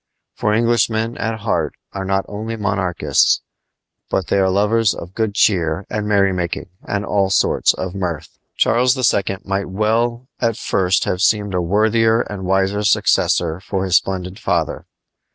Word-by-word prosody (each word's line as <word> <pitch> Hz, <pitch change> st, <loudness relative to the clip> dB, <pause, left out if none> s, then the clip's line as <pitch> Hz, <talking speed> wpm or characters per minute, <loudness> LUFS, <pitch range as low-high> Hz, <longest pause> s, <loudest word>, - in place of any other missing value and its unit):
For 105 Hz, -, -1 dB
Englishmen 115 Hz, 0 st, +1 dB
at 110 Hz, -1 st, -3 dB
heart 85 Hz, -8 st, -1 dB, 0.2 s
are 95 Hz, -1 st, -4 dB
not 95 Hz, 0 st, 0 dB
only 110 Hz, +2 st, -5 dB
monarchists, 90 Hz, -8 st, +1 dB, 0.7 s
but 95 Hz, -5 st, -1 dB
they 100 Hz, -, +2 dB
are 95 Hz, -1 st, +3 dB
lovers 105 Hz, +3 st, +2 dB
of 90 Hz, +2 st, -9 dB
good 110 Hz, -2 st, -2 dB
cheer 90 Hz, -4 st, +1 dB
and 105 Hz, -1 st, -2 dB
merrymaking 95 Hz, -4 st, 0 dB
and 105 Hz, +1 st, -3 dB
all 100 Hz, -2 st, +1 dB
sorts 95 Hz, -, +2 dB
of 95 Hz, -1 st, -4 dB
mirth. 85 Hz, -5 st, -5 dB, 0.2 s
Charles 125 Hz, +2 st, +3 dB
II. 100 Hz, -6 st, +1 dB
might 100 Hz, -1 st, -2 dB
well 115 Hz, +5 st, 0 dB
at 115 Hz, -2 st, 0 dB
first 95 Hz, -5 st, +1 dB
have 90 Hz, -, -2 dB
seemed 105 Hz, -1 st, +2 dB
a 90 Hz, -, +1 dB
worthier 110 Hz, +5 st, +2 dB
and 100 Hz, -5 st, -6 dB
wiser 95 Hz, +2 st, +1 dB
successor 85 Hz, -4 st, +2 dB
to 95 Hz, -2 st, -1 dB
his 95 Hz, -2 st, +4 dB
splendid 95 Hz, +1 st, -4 dB
father. 85 Hz, -7 st, -2 dB
100 Hz, 150 wpm, -19 LUFS, 95-110 Hz, 0.7 s, his